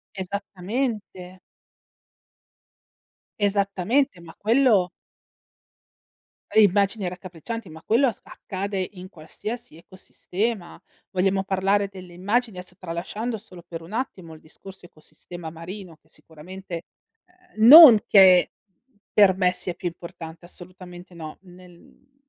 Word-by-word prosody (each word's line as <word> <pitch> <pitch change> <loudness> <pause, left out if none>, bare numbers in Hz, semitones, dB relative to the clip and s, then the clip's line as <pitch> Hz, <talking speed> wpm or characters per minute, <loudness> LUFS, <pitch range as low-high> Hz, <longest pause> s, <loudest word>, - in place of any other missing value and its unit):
Esattamente. 195 0 -5 2.0
Esattamente, 200 +4 0
ma 165 -1 -13
quello 220 -5 +3 1.7
Immagini 200 -1 +3
raccapriccianti, 185 +4 -8
ma 160 0 -12
quello 245 +5 +3 0.2
accade 190 -1 -5
in 185 -1 -11
qualsiasi 205 +4 -8
ecosistema. 185 +3 -5 0.3
Vogliamo 195 0 0
parlare 195 +1 0
delle 185 -2 -12
immagini, 205 +4 -1
adesso 180 0 -10
tralasciando 195 +7 -5
solo 185 -5 -14
per 165 -1 -7
un 165 - -13
attimo 200 -8 -5
il 155 - -14
discorso 190 +4 -15
ecosistema 160 +1 -11
marino, 170 +1 -10
che 155 - -35
sicuramente 170 +3 -10 0.7
uhm 220 - +3
non 295 -4 +12
che 185 -3 +6 0.6
per 200 -3 +5
me 180 -1 +2
sia 180 0 -4
più 175 - -5
importante, 170 -1 -11
assolutamente 180 0 -13
no, 160 -2 -9
nel 180 -1 -16
uhm 270 0 -25
185 Hz, 110 wpm, -24 LUFS, 175-205 Hz, 2.0 s, non